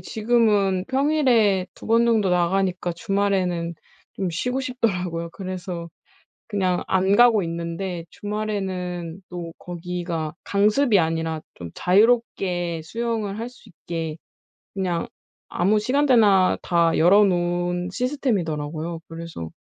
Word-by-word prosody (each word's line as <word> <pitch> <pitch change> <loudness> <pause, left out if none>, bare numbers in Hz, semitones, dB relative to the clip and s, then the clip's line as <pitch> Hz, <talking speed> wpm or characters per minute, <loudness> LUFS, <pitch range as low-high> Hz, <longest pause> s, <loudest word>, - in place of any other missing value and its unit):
지금은 210 -3 +2
평일에 260 -9 +2
2 - - -12
번정도 230 -3 +3
나가니까 180 0 +1
주말에는 185 -4 0 0.4
좀 190 - -2
쉬고 250 +10 -1
싶더라고요. 180 -10 -2
그래서 180 -2 -6 0.6
그냥 185 -4 0
안 190 +1 +3
가고 230 -4 +6
있는데 170 +1 -4
주말에는 190 -5 -4
또 170 -2 -6
거기가 175 -2 -4
강습이 210 +4 +3
아니라 160 -1 -1
좀 85 -1 -8
자유롭게 185 -5 +2
수영을 220 +1 -3
할 235 +2 -4
수 250 - -18
있게 165 -2 -5 0.6
그냥 180 -4 -2 0.4
아무 205 +4 +2
시간대나 225 -7 +4
다 170 -1 +2
열어 195 +6 +6
놓은 175 -1 0
시스템이더라고요. 170 - -2
그래서 165 - -7
185 Hz, 265 characters per minute, -23 LUFS, 170-215 Hz, 0.6 s, 가고